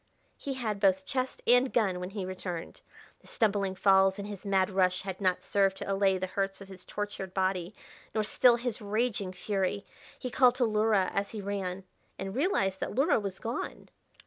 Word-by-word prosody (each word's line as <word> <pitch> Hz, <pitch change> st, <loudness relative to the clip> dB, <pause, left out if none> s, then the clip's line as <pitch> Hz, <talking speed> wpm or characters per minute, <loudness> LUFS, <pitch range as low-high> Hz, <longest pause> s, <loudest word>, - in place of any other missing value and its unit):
He 275 Hz, -1 st, -5 dB
had 220 Hz, -5 st, -2 dB
both 190 Hz, -1 st, +3 dB
chest 260 Hz, +2 st, -3 dB
and 245 Hz, +2 st, +4 dB
gun 195 Hz, -6 st, +1 dB
when 180 Hz, 0 st, -5 dB
he 195 Hz, -1 st, -4 dB
returned. 185 Hz, -2 st, -6 dB, 0.4 s
The -, -, -21 dB
stumbling 200 Hz, -4 st, +1 dB
falls 190 Hz, 0 st, +4 dB
in 200 Hz, -, -5 dB
his 205 Hz, -1 st, -7 dB
mad 190 Hz, -1 st, +2 dB
rush 185 Hz, -1 st, +2 dB
had 190 Hz, 0 st, -6 dB
not 185 Hz, -2 st, +1 dB
served 195 Hz, -1 st, +2 dB
to 195 Hz, -, -2 dB
allay 195 Hz, -1 st, +3 dB
the 185 Hz, -, -2 dB
hurts 195 Hz, +1 st, -2 dB
of 195 Hz, -1 st, -11 dB
his 190 Hz, -1 st, -12 dB
tortured 205 Hz, -2 st, -5 dB
body, 185 Hz, 0 st, 0 dB, 0.4 s
nor 215 Hz, -, +2 dB
still 240 Hz, +3 st, +5 dB
his 235 Hz, -2 st, -3 dB
raging 210 Hz, -2 st, -1 dB
fury. 195 Hz, +1 st, -2 dB, 0.3 s
He 250 Hz, -, -5 dB
called 250 Hz, -1 st, +5 dB
to 255 Hz, -, +2 dB
Luhra 215 Hz, -3 st, +2 dB
as 200 Hz, 0 st, -1 dB
he 215 Hz, -, -4 dB
ran 195 Hz, -2 st, -3 dB, 0.3 s
and 195 Hz, +1 st, -5 dB
realized 205 Hz, -, +1 dB
that -, -, -4 dB
Luhra 275 Hz, +1 st, +3 dB
was 195 Hz, -2 st, -4 dB
gone. 230 Hz, +2 st, -5 dB
195 Hz, 190 wpm, -30 LUFS, 190-220 Hz, 0.4 s, still